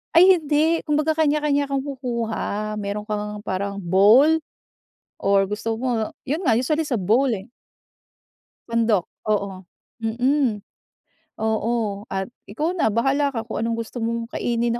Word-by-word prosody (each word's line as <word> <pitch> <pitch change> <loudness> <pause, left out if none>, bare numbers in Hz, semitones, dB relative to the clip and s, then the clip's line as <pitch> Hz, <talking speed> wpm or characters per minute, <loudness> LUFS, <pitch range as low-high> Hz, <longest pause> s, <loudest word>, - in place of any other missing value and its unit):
Ay 365 +2 +8
hindi. 310 +2 +2
Kumbaga 300 +1 +2
kanya-kanya 295 -2 +2
kumukuha, 235 -6 -3
meron 205 +1 -3
ka 215 - -2
ngang 210 0 -5
parang 200 0 -2
bowl 215 - +5 0.8
or 195 0 +3
gusto 220 +2 -2
mo, 230 -2 -2
yun 295 +5 -2
nga 230 - +4
usually 300 +7 +1
sa 265 -4 -1
bowl 225 +9 +3
eh. 195 0 -6 1.2
Sandok, 230 -5 +1 0.2
oo. 195 -2 -2 0.4
Mhm, 245 0 +1 0.8
oo 220 -2 -1
at 190 0 -2 0.2
ikaw 305 - -1
na 315 -11 +2
bahala 270 +6 +2
ka 230 -3 -4
kung 220 - -4
anong 230 0 -1
gusto 230 +1 -5
mong 230 +1 -3
kainin 235 0 0
230 Hz, 135 wpm, -23 LUFS, 210-280 Hz, 1.2 s, Ay